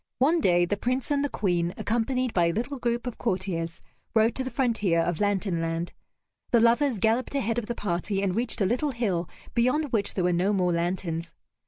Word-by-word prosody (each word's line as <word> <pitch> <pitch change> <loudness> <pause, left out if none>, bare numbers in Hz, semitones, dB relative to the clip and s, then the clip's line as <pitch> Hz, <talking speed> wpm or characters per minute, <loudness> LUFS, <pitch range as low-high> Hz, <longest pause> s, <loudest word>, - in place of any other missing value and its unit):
One 315 +6 +3
day 175 -5 +4
the 205 +3 -1
Prince 255 +6 -1
and 285 -1 +2
the 285 - 0
Queen, 175 -6 0
accompanied 245 +2 0
by 175 -2 +3
a - - +2
little 245 +9 -3
group 240 0 -1
of 245 - -5
courtiers, 180 -5 -2 0.3
rode 225 +1 +4
to 260 - -2
the 260 - -3
frontier 225 -9 +1
of 165 -1 0
Lantern 195 -4 0
Land. 165 +1 -2 0.6
The 240 - +4
lovers 235 +2 +3
galloped 225 +7 +1
ahead 235 -3 +1
of 220 - -7
the 240 - -3
party 195 +1 -1
and 185 -2 0
reached 230 -1 -1
a - - +4
little 250 +9 +1
hill 190 -8 -1 0.2
beyond 255 +5 +1
which 215 -4 -1
there 185 - 0
were 180 0 +2
no 185 +4 +2
more 180 -3 +2
lanterns. 170 -1 -2
210 Hz, 205 wpm, -27 LUFS, 175-245 Hz, 0.6 s, day